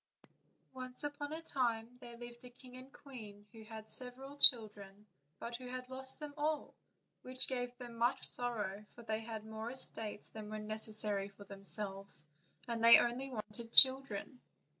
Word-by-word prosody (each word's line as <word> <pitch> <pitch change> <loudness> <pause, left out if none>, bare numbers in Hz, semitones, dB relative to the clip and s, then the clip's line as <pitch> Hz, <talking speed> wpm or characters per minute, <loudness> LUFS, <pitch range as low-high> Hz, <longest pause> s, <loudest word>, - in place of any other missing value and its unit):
ONCE 255 0 0
upon 290 0 -6
a 320 +1 -7
time 235 -7 -3
there 240 -2 -12
lived 240 0 -12
a 250 - -11
king 250 0 -16
and 255 +1 -12
queen 215 -9 -13
who 225 - -15
had 220 0 -11
had - - -3
several 260 +2 -1
children, 210 -6 +5 0.3
but 235 0 -8
who 255 0 -11
had 255 0 -8
lost 265 0 -6
them 300 -1 -9
all, 300 0 -3 0.5
which 255 0 +4
gave 245 -1 -5
them 240 -2 -11
much 240 +3 -1
sorrow, 210 -5 +3
for 235 - -14
they 220 -1 -4
had 220 -1 -9
more 220 +1 -8
estates 225 -4 -1
than 215 -1 -10
were 215 - -7
necessary 215 -1 -3
for 200 +1 -16
themselves, 195 -3 -6 0.4
and 230 -1 -5
only 240 +3 +4
wanted 230 -1 -9
children. 260 -2 +4
235 Hz, 160 wpm, -33 LUFS, 215-255 Hz, 0.5 s, children